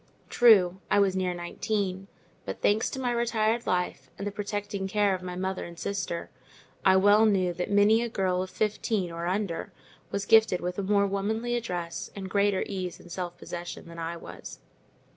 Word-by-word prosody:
True, 190 Hz, -6 st, +5 dB
I -, -, +3 dB
was 195 Hz, -2 st, +3 dB
near 185 Hz, -1 st, 0 dB
nineteen; 190 Hz, +2 st, -3 dB, 0.4 s
but, -, -, -6 dB
thanks 210 Hz, +2 st, +3 dB
to 265 Hz, -, -5 dB
my 250 Hz, -2 st, 0 dB
retired 235 Hz, -1 st, +1 dB
life 180 Hz, -7 st, -1 dB
and 200 Hz, -, -5 dB
the 205 Hz, -, -2 dB
protecting 205 Hz, -1 st, -3 dB
care 205 Hz, 0 st, +2 dB
of 185 Hz, -, -3 dB
my 180 Hz, -1 st, -5 dB
mother 190 Hz, +1 st, -2 dB
and 170 Hz, 0 st, -9 dB
sister, 190 Hz, -4 st, -3 dB, 0.5 s
I 190 Hz, -, +6 dB
well 205 Hz, +3 st, +6 dB
knew 185 Hz, -4 st, +2 dB
that 180 Hz, +1 st, -3 dB
many 205 Hz, +3 st, +5 dB
a 235 Hz, -, -2 dB
girl 185 Hz, -4 st, 0 dB
of 185 Hz, -, -4 dB
fifteen, 210 Hz, -3 st, -1 dB
or 170 Hz, +1 st, -4 dB
under, 185 Hz, -2 st, -2 dB, 0.4 s
was 200 Hz, 0 st, -2 dB
gifted 220 Hz, -5 st, +5 dB
with 180 Hz, +2 st, -3 dB
a -, -, +1 dB
more 200 Hz, +1 st, +3 dB
womanly 220 Hz, +5 st, -1 dB
address, 175 Hz, -8 st, -4 dB
and 190 Hz, -2 st, -6 dB
greater 200 Hz, -1 st, +2 dB
ease 185 Hz, -3 st, -4 dB
and 175 Hz, -, -14 dB
self 175 Hz, -1 st, -4 dB
possession, 175 Hz, 0 st, -7 dB
than 170 Hz, 0 st, -10 dB
I 165 Hz, +1 st, -4 dB
was. -, -, -10 dB
195 Hz, 185 wpm, -28 LUFS, 180-210 Hz, 0.5 s, I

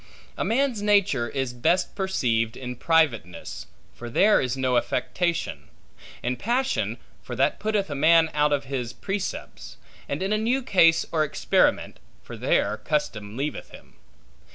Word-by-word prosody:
A -, -, -2 dB
man's 245 Hz, -2 st, 0 dB
nature 200 Hz, -, +2 dB
is 135 Hz, 0 st, -3 dB
best 175 Hz, +9 st, +1 dB
perceived 120 Hz, -, -1 dB
in 125 Hz, -1 st, -6 dB
privateness, 120 Hz, -, 0 dB, 0.3 s
for 120 Hz, -, -8 dB
there 205 Hz, -, +4 dB
is 130 Hz, 0 st, -2 dB
no 130 Hz, -1 st, +1 dB
affectation; 125 Hz, -, -1 dB, 0.6 s
in 125 Hz, +1 st, -1 dB
passion, 255 Hz, +4 st, -1 dB, 0.2 s
for -, -, -7 dB
that -, -, +1 dB
putteth 210 Hz, -2 st, 0 dB
a 150 Hz, -, -5 dB
man 160 Hz, +3 st, +4 dB
out 150 Hz, 0 st, +2 dB
of 145 Hz, -1 st, +1 dB
his 130 Hz, -3 st, -4 dB
precepts; 195 Hz, -1 st, -5 dB, 0.3 s
and -, -, -2 dB
in 195 Hz, +2 st, 0 dB
a 215 Hz, -, +1 dB
new 250 Hz, +4 st, 0 dB
case 165 Hz, -8 st, +4 dB
or 155 Hz, -2 st, +2 dB
experiment, 150 Hz, -, +1 dB, 0.2 s
for -, -, -9 dB
there 105 Hz, -, +1 dB
custom 110 Hz, -5 st, -3 dB
leaveth 145 Hz, +3 st, -4 dB
him. -, -, -15 dB
150 Hz, 150 wpm, -25 LUFS, 125-195 Hz, 0.6 s, there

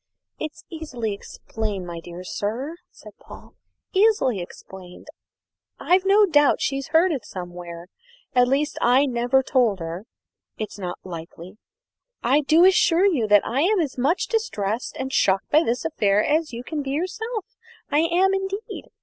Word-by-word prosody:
"It's 310 Hz, 0 st, -6 dB
easily 255 Hz, -10 st, -4 dB
explained, 205 Hz, -1 st, -5 dB
my 170 Hz, -1 st, -6 dB
dear 175 Hz, +2 st, -9 dB
sir," 240 Hz, -, -4 dB
said -, -, -14 dB
Paul; -, -, -14 dB, 0.4 s
"easily 380 Hz, -, +3 dB
explained. 180 Hz, 0 st, -11 dB, 0.7 s
I've 370 Hz, +2 st, +2 dB
no 410 Hz, +2 st, +6 dB
doubt 295 Hz, -6 st, +3 dB
she's 275 Hz, 0 st, -2 dB
heard 340 Hz, +3 st, +3 dB
it 270 Hz, -8 st, -3 dB
somewhere. 175 Hz, -3 st, -8 dB, 0.5 s
At 250 Hz, -1 st, +4 dB
least, 285 Hz, +3 st, 0 dB
I 255 Hz, +4 st, +4 dB
never 250 Hz, +1 st, +1 dB
told 245 Hz, -7 st, +2 dB
her; 170 Hz, +3 st, -6 dB, 0.5 s
it 215 Hz, -, -4 dB
is -, -, -11 dB
not 180 Hz, -2 st, -4 dB
likely. 175 Hz, +2 st, -9 dB, 0.6 s
I 275 Hz, +5 st, +3 dB
do 320 Hz, +4 st, +5 dB
assure 370 Hz, -1 st, +4 dB
you 290 Hz, -, +2 dB
I'm 275 Hz, -, +3 dB
as 300 Hz, -6 st, -1 dB
much 295 Hz, +9 st, +1 dB
distressed 225 Hz, -, -2 dB
and 265 Hz, 0 st, -4 dB
shocked 190 Hz, 0 st, +2 dB
by 305 Hz, -, +6 dB
this 245 Hz, -1 st, -1 dB
affair 210 Hz, -10 st, +2 dB
as 310 Hz, 0 st, +1 dB
you 235 Hz, 0 st, -6 dB
can 305 Hz, +2 st, -4 dB
be 275 Hz, -, -5 dB
yourself. 380 Hz, -, -3 dB, 0.5 s
I 290 Hz, -, +3 dB
am 350 Hz, +4 st, +3 dB
indeed. 390 Hz, +3 st, -4 dB
265 Hz, 150 wpm, -23 LUFS, 205-330 Hz, 0.7 s, no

